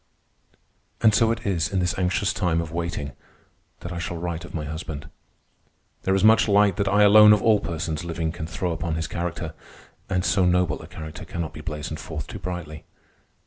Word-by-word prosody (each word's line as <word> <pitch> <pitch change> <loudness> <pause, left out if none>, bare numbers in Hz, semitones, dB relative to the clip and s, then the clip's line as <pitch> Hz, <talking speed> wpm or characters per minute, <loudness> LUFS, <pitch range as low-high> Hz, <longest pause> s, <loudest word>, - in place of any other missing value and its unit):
And 110 - +5
so 115 +1 +4
it 115 - -4
is, 90 -3 0
in 95 - -1
this 90 -1 +1
anxious 95 +2 0
time 85 -4 0
of 85 -1 -4
waiting, 85 -4 -3 0.7
that 85 - -6
I 85 - -4
shall 85 0 -4
write 85 -1 -4
of 85 - -9
my 75 -2 -3
husband. 80 -1 -6 0.9
There 95 - +1
is 95 - +1
much 110 +1 +6
light 100 -2 +4
that 100 -1 0
I 100 +1 +4
alone 105 +1 +9
of 105 - +1
all 110 -2 +5
persons 85 -1 -3
living 85 -1 -2
can 85 -1 -6
throw 85 +2 -2
upon 80 0 -2
his 80 +1 -2
character, 85 -2 -4 0.6
and 90 -2 0
so 95 - +3
noble 90 0 +2
a - - -10
character 80 -1 -8
cannot 85 -2 -5
be - - -8
blazoned 75 0 -5
forth 75 -3 -6
too - - -8
brightly. 85 -4 -6
85 Hz, 195 wpm, -24 LUFS, 80-95 Hz, 0.9 s, alone